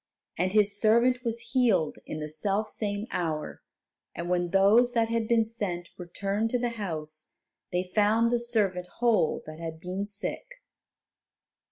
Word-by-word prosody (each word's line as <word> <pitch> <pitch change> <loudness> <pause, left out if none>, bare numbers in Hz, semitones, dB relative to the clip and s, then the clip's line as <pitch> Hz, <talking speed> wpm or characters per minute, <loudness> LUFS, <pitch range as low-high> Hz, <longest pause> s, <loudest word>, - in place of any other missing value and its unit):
And 185 +2 0
his 205 -1 +2
servant 240 +3 +4
was 230 -1 -4
healed 225 - +2
in 155 - -5
the 150 - -3
selfsame 205 +5 -2
hour, 160 -4 -3 0.5
and 170 +2 -4
when 175 -1 +1
those 210 +7 +5
that 230 -1 +2
had 230 -1 0
been 230 -1 +3
sent 195 -6 -4
returned 195 +5 -2
to 245 - +1
the 245 0 -1
house, 155 -8 -5 0.4
they 180 +1 -2
found 220 +2 +3
the 240 - +3
servant 205 -7 0
whole 230 -9 +2
that 155 +1 -9
had 165 -1 -6
been 185 +4 -3
sick. 210 - -5
205 Hz, 150 wpm, -28 LUFS, 175-230 Hz, 0.5 s, those